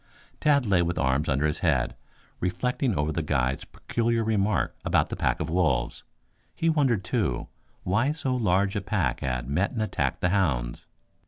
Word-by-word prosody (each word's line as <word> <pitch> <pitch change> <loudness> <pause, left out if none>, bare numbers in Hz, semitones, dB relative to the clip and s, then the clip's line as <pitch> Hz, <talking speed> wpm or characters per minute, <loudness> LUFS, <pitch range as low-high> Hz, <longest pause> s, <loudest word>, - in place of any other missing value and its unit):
Tad 140 -3 +3
lay 95 -4 +3
with 85 0 -1
arms 70 +3 +1
under 70 +2 +1
his 75 0 0
head, 65 -8 +1 0.5
reflecting 125 +6 0
over 75 +2 0
the 80 - -1
guide's 65 -3 0
peculiar 115 -1 -1
remark 105 -3 +1
about - - +2
the - - -3
pack - - 0
of 80 - -2
wolves. 85 0 0 0.5
He 165 - +1
wondered, 135 -10 +2
too, 90 - -1 0.3
why 115 +10 +2
so 140 -4 -1
large 100 -3 +1
a 100 - 0
pack 95 - 0
had 60 -2 -2
met 90 +9 +1
and 115 - -2
attacked 110 - -1
the 90 - +2
hounds. 70 -12 0
90 Hz, 170 wpm, -26 LUFS, 75-115 Hz, 0.5 s, Tad